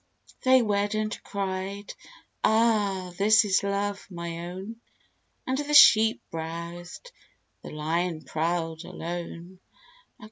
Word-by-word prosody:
They 260 -1 +5
wed, 205 0 0
and 215 0 -1
cried, 195 +1 -4 0.5
"Ah, 210 -5 +2
this 215 +1 +5
is 190 -2 +2
Love, 200 0 -2
my 170 -1 -6
own!" 195 +6 -8 0.6
And 260 +1 -1
the 295 0 -1
Sheep 220 -5 +7
browsed, 170 - -7 0.5
the - - -9
Lion 160 +2 -2
prowled, 165 0 -2
alone. 175 +2 -7
190 Hz, 105 wpm, -26 LUFS, 170-215 Hz, 0.6 s, Sheep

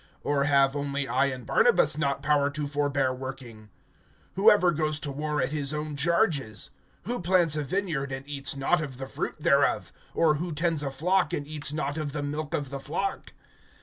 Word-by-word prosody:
(6)Or 145 -1 +1
have 140 -1 +4
only 140 -1 -2
I 140 - +2
and 130 -3 -4
Barnabas - - +4
not 140 -3 -1
power 145 -1 +3
to 145 +1 -3
forbear 140 -2 0
working? 130 -5 -8 0.7
(7)Who 195 +4 +6
ever 180 -4 +4
goes 155 -1 -1
to 145 - -3
war 150 +2 -2
at 130 +1 0
his 150 -1 -1
own 150 0 -4
charges? 145 - +1 0.3
Who 240 +5 -2
plants 175 -3 +3
a 150 - 0
vineyard, 150 -4 -2
and 135 +1 -6
eats 140 0 -3
not 140 +5 +1
of 135 -5 -6
the 135 - -5
fruit - - -5
thereof? - - +2 0.2
Or 155 -2 +3
who 175 -2 -3
tends 165 0 0
a 140 - -2
flock, 180 +7 +1
and 145 -4 -2
eats 150 -1 -3
not 150 0 -2
of 145 -2 -4
the 150 -1 -3
milk 150 +1 -3
of 145 -2 -4
the 140 - -4
flock? 170 +8 -3
145 Hz, 195 wpm, -27 LUFS, 140-155 Hz, 0.7 s, 7)Who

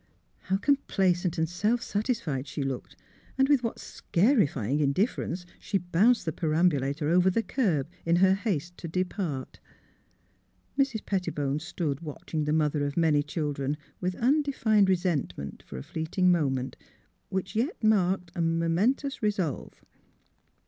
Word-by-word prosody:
" - - -41
How 190 - +3
complacent 190 - +1
and 160 0 +1
self 210 +8 +1
satisfied 205 - -2
slie 140 0 -4
looked, 135 -2 -5 0.4
and 270 0 +4
with 285 -3 +4
what 230 -2 -3
scarifying 170 - +1
indifference 175 - 0
she 200 - -1
bounced 195 +7 +2
the 160 - 0
perambulator 155 -3 +1
over 180 +2 +4
the 225 +5 +1
curb 175 - 0 0.2
in 170 0 +2
her 190 +2 +5
haste 180 -5 -2
to 170 - -6
depart. 175 -5 -3 1.2
Mrs. 270 -6 0
Pettibone 150 -7 -1
stood 160 -4 -3
watching 155 0 -4
the 150 - 0
mother 150 -1 +1
of 145 +1 -3
many 155 -3 +4
children 145 -2 -2 0.2
with 180 0 -2
undefined 240 -6 +3
resent 175 - 0
ment, 70 -1 -7
for - - -9
a 65 - -6
fleeting 180 +3 +1
moment, 135 -6 0 0.5
which 190 +2 -3
yet 240 - -1
marked 190 -4 +2
a 175 - -2
momentous 170 - +1
resolve. 200 - -2
175 Hz, 140 wpm, -28 LUFS, 150-205 Hz, 1.2 s, her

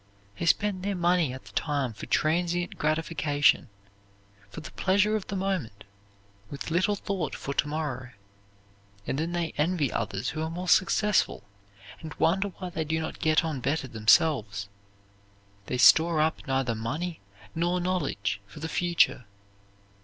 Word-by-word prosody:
They 170 - -2
spend 200 +1 +2
their 200 +1 -2
money 175 -4 +2
at 130 +1 -9
the - - -13
time 140 -6 -1
for 100 - -9
transient 175 +2 0
gratification, 150 -3 +1 0.8
for - - -8
the - - -9
pleasure 205 +3 +2
of 215 - -3
the 200 - -4
moment, 185 - -3 0.7
with 140 +3 -6
little 185 +5 +2
thought 195 -6 -3
for 140 - -5
to 150 - +1
morrow, 145 -4 -4 1.0
and 135 - -2
then 165 +2 -2
they 170 -2 -2
envy 155 -4 +1
others 100 +5 -2
who 155 - -4
are 160 - -2
more 180 +3 -5
successful, 205 +4 +3 0.6
and 160 -1 -8
wonder 190 +4 +2
why 185 -2 -7
they 160 - -2
do 160 +1 -1
not 160 - -5
get 155 0 +3
on 155 -4 -2
better 135 +2 -1
themselves. 110 -3 +2 1.0
They 125 - -2
store 160 +5 +6
up 155 0 0
neither 135 -3 0
money 155 +10 -4 0.3
nor 175 +2 0
knowledge 175 - -1
for 100 - -12
the 160 +2 -4
future. 170 -8 +2
160 Hz, 155 wpm, -27 LUFS, 135-180 Hz, 1.0 s, store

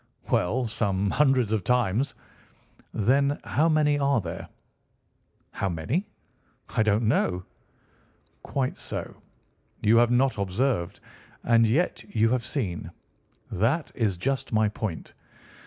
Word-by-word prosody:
"Well, 120 +8 +1
some 100 -3 0
hundreds 135 -6 +3
of 110 -4 0
times." 125 +3 +1 0.8
"Then 140 +6 +2
how 160 +3 +2
many 150 -2 +3
are 140 -2 +2
there?" 85 -4 -6 1.0
"How 95 - -2
many? 100 - -2 0.6
I - - 0
don't 110 +1 +2
know." 90 -5 +1 1.0
"Quite 130 -2 -2
so! - - -6 0.7
You 110 +2 +5
have 120 0 +5
not 125 -1 +2
observed. 100 -1 -1 0.4
And 115 -1 +4
yet 150 +11 +1
you 110 +1 +4
have 125 0 0
seen. 90 - -3 0.6
That 125 - 0
is 105 -6 0
just 135 +8 -2
my 110 -1 +3
point. 105 -5 -5
115 Hz, 120 wpm, -26 LUFS, 100-135 Hz, 1.0 s, You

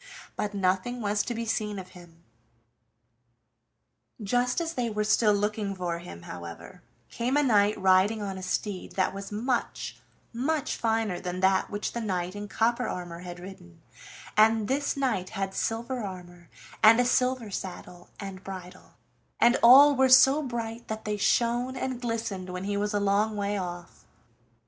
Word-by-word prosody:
But 210 0 -3
nothing 195 +6 0
was 210 -1 0
to 240 - -4
be 230 0 -3
seen 210 -2 -2
of 185 -1 -8
him. 170 -2 -16 2.0
Just 245 - 0
as 330 -1 -3
they 245 -5 -1
were 210 -1 -1
still 215 0 +3
looking 205 0 -1
for 175 -2 -3
him, 130 - -10
however, 85 -1 -9 0.3
came 250 +4 0
a 295 - +3
knight 210 -5 +3
riding 190 +3 +4
on 200 -2 -4
a 190 - -7
steed 185 +1 -3
that 190 -1 0
was 195 +1 -7
much, 235 +4 -2 0.3
much 280 +5 -1
finer 220 -5 0
than 180 0 -4
that 190 0 +2
which 205 0 -3
the 235 - -3
knight 185 -3 -2
in 205 0 -6
copper 235 +3 0
armor 175 -2 -5
had 175 0 -8
ridden, 175 - -12 0.6
and 220 0 +4
this 280 +3 -1
knight 250 -10 -1
had 195 0 -2
silver 235 +5 -2
armor 175 -3 -9 0.3
and 225 +2 +7
a 245 - +3
silver 250 -3 +1
saddle 180 -2 -7
and 195 -2 -7
bridle, 185 -1 -10 0.4
and 240 +1 +5
all 275 +4 +8
were 265 0 +4
so 270 +3 +7
bright 235 -3 -5
that 220 0 -5
they 210 0 -1
shone 240 +4 +1
and 255 -1 -3
glistened 225 -6 -3
when 180 +1 -5
he 200 +1 -2
was 205 +1 -1
a - - +2
long 205 +2 +1
way 205 0 -1
off. 175 -2 -6
210 Hz, 165 wpm, -27 LUFS, 185-235 Hz, 2.0 s, all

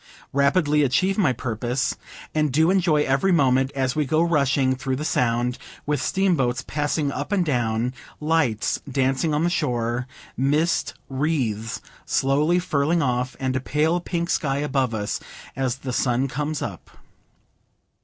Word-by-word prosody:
Rapidly 150 +2 +3
achieve 185 +8 +2
my 170 -10 +4
purpose, 120 +1 -2 0.4
and 155 -2 +1
do 160 +6 +3
enjoy 170 -6 +3
every 135 +9 +2
moment, 135 -4 +3
as 130 -2 0
we 155 - +2
go 155 +4 +2
rushing 140 -5 +2
through 130 0 -2
the 150 +4 -4
Sound, 125 -1 0 0.3
with 145 -2 0
steamboats 135 -10 +1
passing 145 0 -1
up 145 +6 -4
and 190 -4 +2
down, 120 -3 0 0.3
lights 150 -8 +1
dancing 135 +4 +1
on 150 +2 +1
the 175 - +2
shore, 120 -5 -1 0.3
mist 150 +6 +1
wreaths 130 -6 -1 0.2
slowly 150 +6 +2
furling 160 -1 +1
off, 125 -1 -1
and 130 -1 -1
a - - +1
pale 155 +6 +1
pink 170 -1 -2
sky 140 -5 0
above 135 -5 0
us, 105 -1 -2 0.4
as 130 -2 -1
the 135 -2 -6
sun 125 +2 +1
comes 150 +3 -3
up. - - -7
140 Hz, 145 wpm, -23 LUFS, 125-155 Hz, 0.4 s, my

